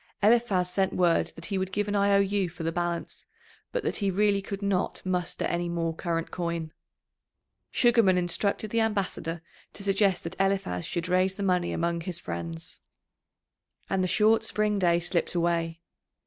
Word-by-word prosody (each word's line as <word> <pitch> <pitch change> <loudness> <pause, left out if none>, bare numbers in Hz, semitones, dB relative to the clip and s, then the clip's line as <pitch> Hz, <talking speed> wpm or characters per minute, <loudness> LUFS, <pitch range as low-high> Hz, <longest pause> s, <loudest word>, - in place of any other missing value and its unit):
Eliphaz 210 -5 +3
sent 190 +1 0
word 175 -2 +3
that 165 - -8
he 195 -2 -1
would 190 0 -2
give 205 +2 -1
an 205 - -1
I 200 0 +3
O - - +6
U 200 -2 +1
for 170 0 -8
the 165 - 0
balance, 175 0 -3 0.4
but - - -2
that - - 0
he 200 -2 0
really 200 +1 +2
could 200 +1 -6
not 195 -2 0
muster 180 -2 -1
any 175 0 -1
more 165 -1 -1
current 165 0 -3
coin. 170 -2 -3 1.0
Sugarman 230 -6 +4
instructed 200 +4 0
the 230 - +2
ambassador 190 -6 -2 0.3
to 200 - -7
suggest 195 -1 +2
that 165 +2 -6
Eliphaz 195 - 0
should 170 0 -3
raise 185 +1 +2
the 200 - -4
money 180 -2 +1
among 170 0 -1
his 175 0 -4
friends. 85 - -6 1.1
And 190 -1 +2
the - - +1
short 215 +4 +3
spring 210 -1 0
day 170 -2 +3
slipped 175 0 -1
away. 170 -1 0
185 Hz, 175 wpm, -27 LUFS, 170-200 Hz, 1.1 s, O